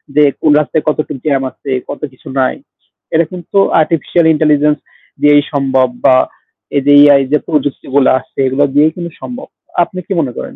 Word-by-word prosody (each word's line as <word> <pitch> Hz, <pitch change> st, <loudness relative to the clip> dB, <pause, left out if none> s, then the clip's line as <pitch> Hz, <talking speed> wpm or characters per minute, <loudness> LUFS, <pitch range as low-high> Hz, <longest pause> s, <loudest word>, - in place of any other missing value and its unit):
যে, 150 Hz, -, +5 dB, 0.2 s
"কোন 155 Hz, -, +3 dB
রাস্তায় 150 Hz, +1 st, -1 dB
কতটুক 150 Hz, -2 st, -3 dB
জ্যাম 140 Hz, -3 st, +1 dB
আছে, 140 Hz, -, -8 dB, 0.2 s
কত -, -, -7 dB
কিছু 130 Hz, -, -19 dB
নাই।" 130 Hz, -, +1 dB, 0.6 s
এটা 165 Hz, +1 st, +3 dB
কিন্তু 180 Hz, +2 st, -5 dB, 0.2 s
আর্টিফিশিয়াল 165 Hz, +1 st, +1 dB
ইন্টেলিজেন্স 150 Hz, -1 st, +2 dB, 0.4 s
দিয়েই 145 Hz, 0 st, +5 dB
সম্ভব 135 Hz, -2 st, +1 dB, 0.2 s
বা 130 Hz, -, +6 dB, 0.6 s
এই 140 Hz, -, +2 dB
যে 145 Hz, -, +4 dB
AI 145 Hz, -1 st, +6 dB
যে 150 Hz, -, +4 dB
প্রযুক্তিগুলা 140 Hz, -2 st, 0 dB
আসছে, -, -, -15 dB
এগুলা 135 Hz, +2 st, +1 dB
দিয়েই 150 Hz, +2 st, +3 dB
কিন্তু 170 Hz, -2 st, -6 dB
সম্ভব। 250 Hz, +2 st, -8 dB, 0.4 s
আপনি 185 Hz, +1 st, -7 dB
কি -, -, -2 dB
মনে 135 Hz, -5 st, -3 dB
করেন? -, -, -7 dB
150 Hz, 170 wpm, -13 LUFS, 140-160 Hz, 0.6 s, বা